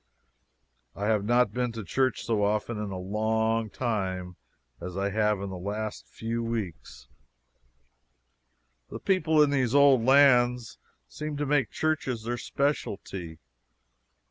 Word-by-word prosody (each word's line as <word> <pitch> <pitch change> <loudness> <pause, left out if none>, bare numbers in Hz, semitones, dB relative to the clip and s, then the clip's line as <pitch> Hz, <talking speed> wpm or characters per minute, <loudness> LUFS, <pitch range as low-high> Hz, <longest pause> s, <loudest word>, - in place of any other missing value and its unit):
I 100 - -3
have 105 -2 +1
not 120 -2 +3
been 125 0 -1
to 115 -1 -6
church 130 +6 0
so 110 -3 +1
often 105 +2 0
in 105 -1 -3
a 95 - -5
long 110 +3 0
time 95 -6 -3 0.5
as 90 +1 -6
I 100 +1 -1
have 105 -1 +1
in 100 -1 -5
the 95 - -6
last 105 +3 -5
few 115 +1 -4
weeks. 95 - -5 1.8
The - - -6
people 160 -5 +3
in 145 - +1
these 130 -2 +1
old 140 -4 +6
lands 125 -3 +4 0.3
seem 150 -1 -6
to 145 - -1
make 140 -4 +1
churches 150 -7 -1
their 120 +1 -3
specialty. 100 - -3
115 Hz, 135 wpm, -27 LUFS, 100-130 Hz, 1.8 s, old